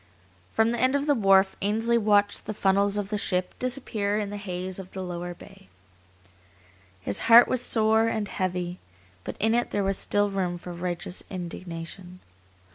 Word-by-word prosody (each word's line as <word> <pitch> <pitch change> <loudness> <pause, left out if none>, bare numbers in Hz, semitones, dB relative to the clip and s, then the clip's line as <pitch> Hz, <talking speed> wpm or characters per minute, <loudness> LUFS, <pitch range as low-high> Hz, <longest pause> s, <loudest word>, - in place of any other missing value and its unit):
From 225 +1 +2
the 240 - -2
end 260 +2 +3
of 280 0 0
the 295 - +3
wharf 195 -5 +4
Ainsley 225 +4 +1
watched 205 -2 +2
the 215 - -4
funnels 200 +1 +2
of 205 -1 -3
the 210 -1 -2
ship 180 -2 -1
disappear 230 -5 -1
in 205 -1 -2
the 205 - -5
haze 185 -1 -5
of 185 -1 -9
the 190 - -5
lower 175 0 -5
bay. 195 +1 -15 1.3
His 100 +1 -1
heart 235 +1 +9
was 255 - 0
sore 220 -1 +2
and 220 -2 -1
heavy, 180 -2 -3 0.4
but - - -6
in 220 +2 +2
it 240 +1 +1
there 205 - -1
was 195 0 0
still 205 0 +1
room 185 -3 -2
for 175 0 -8
righteous 175 +1 -4
indignation. 175 0 -7
200 Hz, 175 wpm, -26 LUFS, 180-220 Hz, 1.3 s, heart